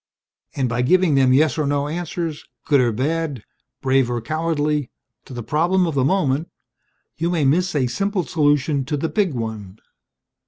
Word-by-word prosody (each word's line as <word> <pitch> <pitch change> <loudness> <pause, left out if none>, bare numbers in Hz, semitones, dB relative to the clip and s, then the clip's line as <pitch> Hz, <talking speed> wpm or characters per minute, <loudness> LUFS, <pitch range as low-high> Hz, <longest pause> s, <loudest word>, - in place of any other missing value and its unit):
And 135 -3 0
by 120 +1 -1
giving 180 +5 +3
them 135 -2 +4
yes 145 +1 +3
or 150 - 0
no 145 0 0
answers 165 -1 -4 0.2
good 140 -3 +4
or 120 -2 +2
bad, 145 +1 -2 0.4
brave 130 -2 +2
or 120 -1 -1
cowardly 150 0 -1 0.4
to - - -11
the 120 - -5
problem 175 +8 +1
of 165 - -2
the 135 -2 +1
moment 145 -1 +1 0.7
you 165 +1 -1
may 165 -5 +1
miss 175 +5 +2
a 135 -3 +2
simple 195 - -1
solution 145 -3 +1
to 145 +2 -2
the 160 +3 -2
big 195 -9 0
one. 110 -4 -5
145 Hz, 170 wpm, -21 LUFS, 130-165 Hz, 0.7 s, them